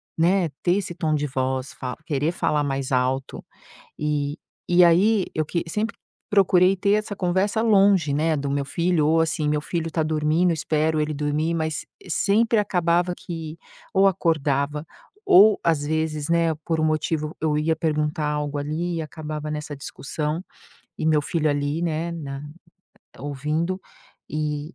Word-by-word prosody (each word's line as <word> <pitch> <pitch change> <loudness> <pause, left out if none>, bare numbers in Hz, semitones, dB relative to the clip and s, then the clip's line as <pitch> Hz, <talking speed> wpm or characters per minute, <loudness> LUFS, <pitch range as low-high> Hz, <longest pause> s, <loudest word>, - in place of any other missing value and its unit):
né, 175 +1 +2
ter 175 - +2
esse 185 -3 -3
tom 160 -3 0
de 150 0 -1
voz, 130 -1 -2
fa 125 -1 -6
querer 150 +2 0
falar 150 -4 0
mais 135 -1 -2
alto, 130 +1 -1 0.6
e 150 0 -1 0.3
e 175 0 +5
aí 190 +4 +4
eu 155 - 0
que 170 +3 -2
sempre 215 +6 -2 0.4
procurei 190 -2 +4
ter 200 +2 +1
essa 215 -1 0
conversa 190 +4 0
longe, 195 -9 +4
né, 155 +2 +1
do 140 0 -3
meu 140 0 0
filho 170 +1 +1
ou, 160 +1 +3
assim, 160 -2 0
meu 150 0 +1
filho 165 +1 -3
tá 160 - 0
dormindo, 155 +3 +1
eu - - +2
espero 155 0 0
ele 155 0 0
dormir, 150 +3 -1
mas, 160 -1 -2 0.2
sempre 220 +6 +2
acabava 180 -3 +1
que, 165 -2 -7 0.3
ou 195 0 +4
acordava 150 -4 0 0.4
ou, 220 - +7
às 160 -3 +2
vezes, 155 0 -1
né, 165 -1 +2
por 165 -2 0
um - - +2
motivo 155 0 -1
eu 150 -1 0
ia 160 +1 +1
perguntar 150 -1 -1
algo 150 -1 -2
ali 155 +4 -2
e 160 - -2
acabava 155 -1 -6
nessa 150 -1 -5
discussão, 150 +4 -4 0.5
e - - -5
meu 155 -1 +4
filho 155 +1 0
ali, 145 +3 -1
né, 165 0 -1
na 140 -4 -6 0.8
ouvindo 150 +7 -2 0.5
e 150 +1 -3
155 Hz, 160 wpm, -24 LUFS, 150-175 Hz, 0.8 s, ou